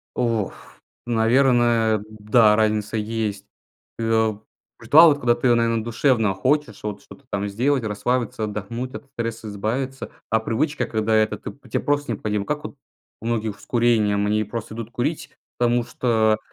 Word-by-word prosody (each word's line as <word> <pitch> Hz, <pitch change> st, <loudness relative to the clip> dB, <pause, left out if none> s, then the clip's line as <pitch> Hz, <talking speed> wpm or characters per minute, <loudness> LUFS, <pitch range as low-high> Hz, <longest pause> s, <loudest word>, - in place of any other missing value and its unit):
В -, -, -2 dB
Ох. 115 Hz, -5 st, 0 dB, 0.5 s
Наверное, 120 Hz, -2 st, +3 dB
да, 105 Hz, 0 st, +3 dB
разница 110 Hz, 0 st, 0 dB
есть. 105 Hz, -2 st, -3 dB, 0.5 s
Э, -, -, -3 dB
а, 110 Hz, -2 st, +1 dB, 0.4 s
ритуал- 155 Hz, +8 st, +7 dB
это 145 Hz, -, -4 dB
когда 120 Hz, -2 st, +3 dB
ты, 120 Hz, -1 st, +2 dB
наверно, 115 Hz, -1 st, +1 dB
душевно 115 Hz, -3 st, +1 dB
хочешь 145 Hz, +8 st, 0 dB
вот 105 Hz, -1 st, -5 dB
что-то 140 Hz, -, -15 dB
там 100 Hz, 0 st, -2 dB
сделать, 130 Hz, +6 st, +1 dB
расслабиться, 110 Hz, +1 st, -1 dB
отдохнуть, 110 Hz, +5 st, -5 dB
от 140 Hz, -, -8 dB
стресса 115 Hz, -4 st, -5 dB
избавиться, 125 Hz, +7 st, -3 dB, 0.2 s
а 110 Hz, -, +3 dB
привычка, 130 Hz, +8 st, -1 dB
когда 110 Hz, 0 st, 0 dB
это 110 Hz, -1 st, +2 dB
ты -, -, -7 dB, 0.2 s
те -, -, 0 dB
просто 145 Hz, -4 st, 0 dB
необходима. 105 Hz, -1 st, -2 dB
Как 150 Hz, +6 st, -3 dB
вот 145 Hz, -, -7 dB, 0.4 s
у 115 Hz, -, -8 dB
многих 110 Hz, -3 st, -2 dB
с -, -, -16 dB
курением? 110 Hz, -4 st, +2 dB
Они 105 Hz, +1 st, +1 dB
просто 110 Hz, +1 st, -6 dB
идут 115 Hz, -1 st, -6 dB
курить, 130 Hz, +7 st, -3 dB, 0.3 s
потому 120 Hz, 0 st, +2 dB
что 110 Hz, -4 st, +1 dB
115 Hz, 160 wpm, -22 LUFS, 105-125 Hz, 0.5 s, ритуал